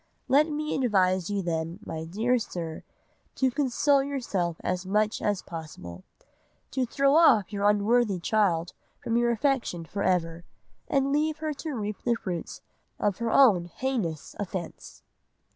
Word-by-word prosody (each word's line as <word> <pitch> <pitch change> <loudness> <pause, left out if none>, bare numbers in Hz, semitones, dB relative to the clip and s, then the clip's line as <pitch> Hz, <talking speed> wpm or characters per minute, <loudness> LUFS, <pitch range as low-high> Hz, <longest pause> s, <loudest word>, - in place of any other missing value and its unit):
Let 295 +4 +4
me 305 0 -2
advise 190 -8 +2
you 200 -1 -1
then, 165 0 -2
my 160 0 -5
dear 225 +9 +1
sir, 170 -6 -5 0.5
to 260 -1 +2
console 280 +1 +2
yourself 220 - -2
as 180 0 -2
much 210 +3 0
as 205 -2 0
possible, 125 - -9 0.7
to 260 -2 -1
throw 275 +3 +2
off 240 - +5
your 205 0 +2
unworthy 210 -1 +2
child 175 -3 +1 0.2
from 230 - -3
your 240 0 +3
affection 235 - 0
for 200 +5 -5
ever, 170 -3 0 0.4
and 275 0 +1
leave 305 +2 +1
her 310 -1 -3
to 295 0 -5
reap 210 -3 -4
the 240 -1 +1
fruits 180 -7 -5 0.4
of 205 -2 -1
her 235 -1 -1
own 210 -12 +5
heinous 175 - -3
offence." 185 -3 -6
210 Hz, 145 wpm, -27 LUFS, 175-265 Hz, 0.7 s, off